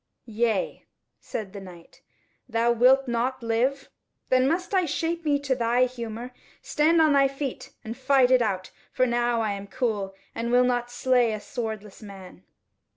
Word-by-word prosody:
"Yea," 225 -2 -1 0.3
said 210 -3 -6
the 200 - -7
Knight, 175 -3 -14 0.5
"thou 230 +1 +2
wilt 255 +3 +4
not 240 +2 -1
live? 250 +5 0 0.4
Then 255 0 +4
must 360 +6 -1
I 370 -2 +3
shape 330 +2 -2
me 295 -2 +2
to 280 -2 0
thy 245 0 +2
humour. 240 0 -6 0.3
Stand 325 +2 +2
on 310 -2 +5
thy 275 -1 +5
feet 275 -1 -6
and 225 +1 -6
fight 265 -1 +3
it 255 -1 +5
out; 190 -5 -2 0.2
for 255 - +2
now 240 -1 +1
I 215 -2 0
am 200 0 -6
cool 200 -3 -2 0.2
I 230 - -3
will 245 +1 +4
not 245 -1 0
slay 245 -2 +2
a 215 - -4
swordless 220 -2 -6
man." 195 -3 -11
240 Hz, 165 wpm, -25 LUFS, 220-265 Hz, 0.5 s, on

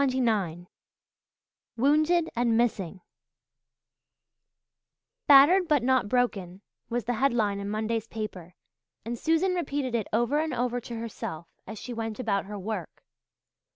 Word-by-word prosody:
CHAPTER 260 -2 +1
XXIX 195 -9 0 1.1
"WOUNDED 310 +6 +3
AND 235 -1 +2
MISSING" 200 -6 -1 2.3
"Battered 295 +7 +7
but 295 -6 +2
Not 255 -4 +2
Broken" 200 -7 -1 0.3
was 240 -1 -2
the 245 - 0
headline 225 -5 +1
in 200 0 -4
Monday's 220 +1 -2
paper, 190 -6 -7 0.5
and 235 +1 -3
Susan 325 +8 +1
repeated 285 -7 -2
it 225 -3 -1
over 240 +7 +1
and 315 0 -1
over 245 0 -1
to 235 0 -7
herself 220 -8 -6 0.2
as 220 - -7
she 245 +4 -7
went 225 -1 -4
about 200 -5 0
her 205 +1 -7
work. 195 -3 -6
235 Hz, 130 wpm, -27 LUFS, 210-265 Hz, 2.3 s, Battered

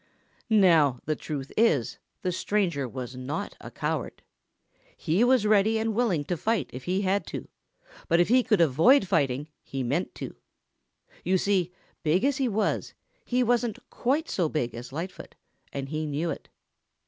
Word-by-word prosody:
Now 165 - +5
the 155 - 0
truth 140 -3 -5
is, 160 - +2 0.2
the 180 - 0
stranger 175 -7 0
was 125 0 -6
not 145 +10 -4
a - - -8
coward. - - -3 0.7
He 175 +7 +1
was 250 -3 +4
ready 215 +1 +4
and 220 0 0
willing 210 -10 +1
to 175 +4 -2
fight 225 +5 -1
if 125 +1 -8
he 185 +2 0
had 195 +1 0
to, - - -6 0.6
but 170 - +3
if 175 - +4
he 255 +3 +5
could 215 -7 +2
avoid 170 - +5
fighting 145 -5 +1
he 135 -1 -4
meant 145 +9 -1
to. - - -7 0.9
You 190 - +2
see, 185 -2 +1 0.3
big 175 - +2
as 280 -1 +2
he 265 - +1
was, 215 -2 -1 0.3
he 250 0 +1
wasn't 240 -2 +1
quite 290 +6 0
so 170 -5 0
big 125 -7 -2
as 120 +2 -8
Lightfoot, 165 +6 -7 0.4
and 135 -1 -5
he 155 +1 -2
knew 155 +3 -1
it. - - -8
180 Hz, 165 wpm, -27 LUFS, 145-220 Hz, 0.9 s, Now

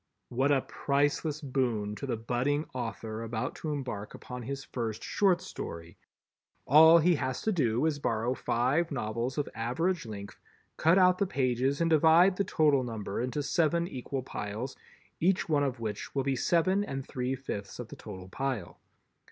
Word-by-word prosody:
What 135 +4 +1
a 135 -2 +4
priceless 145 +3 0
boon 125 -7 -1
to 140 - -5
the 120 -3 -1
budding 125 +7 0
author 115 -3 -4
about 115 -1 -3
to 155 - -4
embark 125 -8 -4
upon 125 0 -8
his 135 +3 -5
first 115 -3 -4
short 190 -4 +2
story! 85 0 -7 0.7
All 160 +4 +8
he 170 +2 +4
has 130 -2 -3
to 220 - +1
do 125 - +1
is 155 -2 +1
to - - -13
borrow 115 +1 0
five 130 +8 +1
novels 120 0 -2
of 145 - 0
average 140 +7 -1
length, 100 -2 -8 0.4
cut 165 +4 +4
out 185 -1 +5
the 200 - +2
pages 130 -2 0
and 165 - +3
divide 165 +4 +6
the 200 - +2
total 150 -7 +3
number 110 -3 -4
into 130 +4 -2
seven 170 +2 +1
equal 130 -2 -4
piles, 110 +2 -5 0.4
each 185 +3 +2
one 150 -3 +2
of 130 -3 -2
which 110 +1 -5
will 135 - +1
be 135 0 0
seven 185 +8 +2
and 135 -8 -5
three 125 +1 -2
fifths 105 -7 -6
of - - -7
the - - -8
total 95 -1 -9
pile. 125 -2 -4
135 Hz, 175 wpm, -30 LUFS, 115-155 Hz, 0.7 s, All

